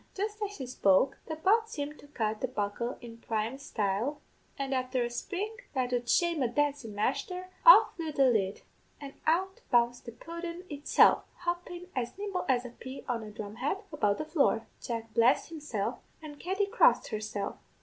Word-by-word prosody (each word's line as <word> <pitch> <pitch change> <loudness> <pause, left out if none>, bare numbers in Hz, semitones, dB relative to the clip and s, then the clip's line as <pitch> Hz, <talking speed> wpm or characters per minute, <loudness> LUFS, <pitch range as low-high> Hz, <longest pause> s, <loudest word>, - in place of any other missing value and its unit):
"Jist 420 +2 -3
as 410 0 -4
she 265 - -5
spoke, 245 +1 +3
the 315 - -3
pot 435 +8 +3
seemed 295 -5 -5
to - - -14
cut 220 -6 -2
the 255 - +1
buckle 235 +1 -3
in 230 -1 -10
prime 225 +4 -2
style, 225 +3 -1 0.4
and 275 -1 -2
afther 255 -1 0
a 240 - -3
spring 395 - -4 0.2
that 250 -1 0
'ud 240 -1 -1
shame 340 -1 +3
a 250 - +3
dancin' 275 -3 -1
masther, 360 - -2 0.2
off - - +9
flew 325 -3 -4
the 275 -2 +3
lid, 210 -6 +1 0.4
and 280 -1 -8
out 375 +4 +1
bounced 240 0 +2
the 235 - -6
pudden 335 +7 -7
itself, 290 0 +4 0.2
hoppin', 350 0 -3
as 250 +5 -3
nimble 400 -3 -3
as 250 -1 +2
a - - -5
pea 260 +3 -9
on 240 -3 -1
a 215 - -8
drum 210 0 -7
head, 295 - -1
about 210 -9 +2
the 310 - -3
floor. 285 -8 +2 0.2
Jack 230 -2 -5
blessed 240 +6 +4
himself, 255 -8 -3 0.2
and 295 -2 -10
Katty 385 +3 0
crossed 445 +4 +4
herself. 210 -2 -4
265 Hz, 180 wpm, -30 LUFS, 230-335 Hz, 0.4 s, off